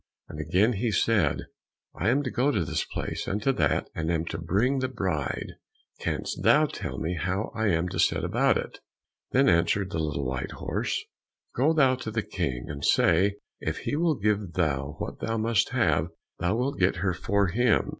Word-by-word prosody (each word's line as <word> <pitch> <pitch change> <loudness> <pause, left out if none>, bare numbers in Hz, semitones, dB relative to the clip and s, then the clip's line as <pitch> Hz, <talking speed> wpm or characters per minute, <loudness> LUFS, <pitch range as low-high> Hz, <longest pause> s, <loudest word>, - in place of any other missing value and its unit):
And 75 - -8
again, 100 +9 +2
he 115 +3 -1
said, 105 +1 +2 0.5
"I 95 +7 0
am 140 +4 +2
to 130 - -3
go 130 +3 +2
to 100 - +1
this - - -1
place - - -4
and 100 - -1
to 135 - +3
that, 75 - +1
and 80 0 -2
am 80 -1 0
to 80 - -4
bring 105 +12 +1
the 130 - 0
bride; 75 - -2 0.5
canst - - -3
thou - - +5
tell - - -5
me 80 +3 -2
how 95 +4 -2
I 110 -1 0
am 85 -2 +1
to - - -4
set - - +2
about - - +2
it?" - - -6 0.5
Then 135 +2 +4
answered 95 +3 +2
the 85 - -2
little 75 -3 -2
white 65 0 -3
horse, - - -2 0.5
"Go 140 +6 +3
thou 135 -5 +4
to 120 - -5
the 110 0 -1
King, 60 -2 -3
and 70 -1 -6
say 100 +5 +4 0.2
if - - -3
he - - 0
will 165 0 +2
give 105 -4 0
thou 75 -4 -1
what - - -5
thou 115 0 -2
must 110 -2 +2
have, 80 - +2 0.3
thou 90 +4 +1
wilt 130 +4 -1
get 90 0 +3
her 90 - +2
for 95 +2 +1
him. 120 +4 +2
95 Hz, 195 wpm, -27 LUFS, 80-115 Hz, 0.5 s, thou